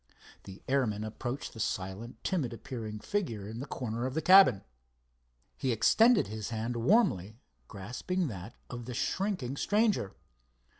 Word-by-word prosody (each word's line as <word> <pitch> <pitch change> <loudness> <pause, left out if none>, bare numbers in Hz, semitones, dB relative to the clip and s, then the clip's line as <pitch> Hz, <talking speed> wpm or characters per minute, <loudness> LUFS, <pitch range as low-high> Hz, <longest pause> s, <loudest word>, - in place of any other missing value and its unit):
The 95 0 -11
airman 120 -6 +1
approached 120 +5 -5
the 115 - -10
silent, 95 +4 -4
timid 150 -11 -1
appearing 110 -2 -6
figure 115 - -2
in 110 +2 -6
the 140 - -6
corner 120 -1 -3
of 130 - -6
the 160 - +1
cabin. 185 - +7 0.9
He 130 - -1
extended 225 - +5
his 105 +1 -5
hand 115 +1 -3
warmly, 115 - +2 0.3
grasping 125 - -3
that 100 -1 -7
of 120 -2 -7
the 125 0 -6
shrinking 180 - -1
stranger. 205 - +1
120 Hz, 140 wpm, -31 LUFS, 110-160 Hz, 0.9 s, cabin